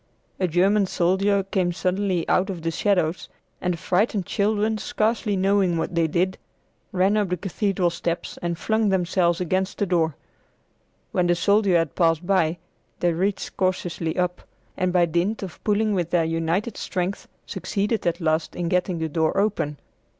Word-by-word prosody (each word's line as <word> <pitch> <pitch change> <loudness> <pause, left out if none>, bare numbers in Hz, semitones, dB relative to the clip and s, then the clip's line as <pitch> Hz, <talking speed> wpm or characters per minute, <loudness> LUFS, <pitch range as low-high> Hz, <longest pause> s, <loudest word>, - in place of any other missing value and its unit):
A 185 - +2
German 195 +4 +3
soldier 190 +3 +2
came 190 -2 0
suddenly 185 0 -1
out 190 +2 +2
of 175 -4 -5
the 165 - 0
shadows, 180 -2 0 0.3
and 180 -1 0
the - - -10
frightened 190 +3 0
children, 215 +2 0
scarcely 215 0 0
knowing 190 -2 +2
what 170 - -2
they 165 -1 +2
did, 180 +4 0 0.5
ran 190 +1 +2
up 205 -3 +1
the 180 - -1
cathedral 190 0 0
steps 170 0 -3
and 170 -1 -2
flung 220 +2 +1
themselves 175 -2 +1
against 185 +2 -1
the 205 - +1
door. 165 -5 +1 1.0
When 180 -1 +1
the 175 - +3
soldier 200 0 +3
had 165 -3 0
passed 165 0 +2
by, 175 -3 +2 0.4
they 175 -1 +2
reached 190 +3 -2
cautiously 175 -3 -1
up, 180 0 -1 0.3
and 185 -1 0
by 175 -1 +4
dint 175 +6 -1
of 185 -4 -9
pulling 215 0 +2
with 175 -4 -1
their 170 -1 +2
united 165 +7 -1
strength 185 +2 -3 0.2
succeeded 210 0 -2
at 170 +1 0
last 160 -1 0
in 175 -1 -2
getting 180 0 0
the 160 0 -1
door 160 0 0
open. 195 -8 0
180 Hz, 165 wpm, -24 LUFS, 170-200 Hz, 1.0 s, by